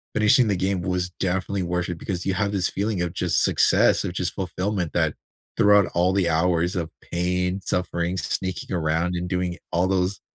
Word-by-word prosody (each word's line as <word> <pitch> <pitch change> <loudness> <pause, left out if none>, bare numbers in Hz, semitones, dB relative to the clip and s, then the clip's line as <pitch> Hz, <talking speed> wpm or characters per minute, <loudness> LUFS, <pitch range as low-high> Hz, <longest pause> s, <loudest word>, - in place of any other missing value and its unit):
finishing 110 +3 +4
the 100 - +1
game 95 0 -1
was 90 0 -1
definitely 95 +1 -1
worth 90 0 -2
it, 90 - -4
because 90 -1 -4
you 95 - +1
have 100 -1 0
this 95 -2 +1
feeling 100 -2 -2
of 85 -1 -2
just 90 -1 +1
success, - - +3
of - - -3
just 90 -1 -2
fulfillment 95 -2 -2
that, - - +1 0.4
throughout 105 -2 +5
all 90 +2 +2
the 95 -3 +2
hours 85 +2 +1
of 85 -3 -2
pain, 90 +2 -1
suffering, 90 -1 -1
sneaking 95 +3 -3
around 85 +2 0
and 90 0 -3
doing 90 -1 -1
all 90 +2 +2
those 95 0 0
90 Hz, 185 wpm, -24 LUFS, 85-95 Hz, 0.4 s, throughout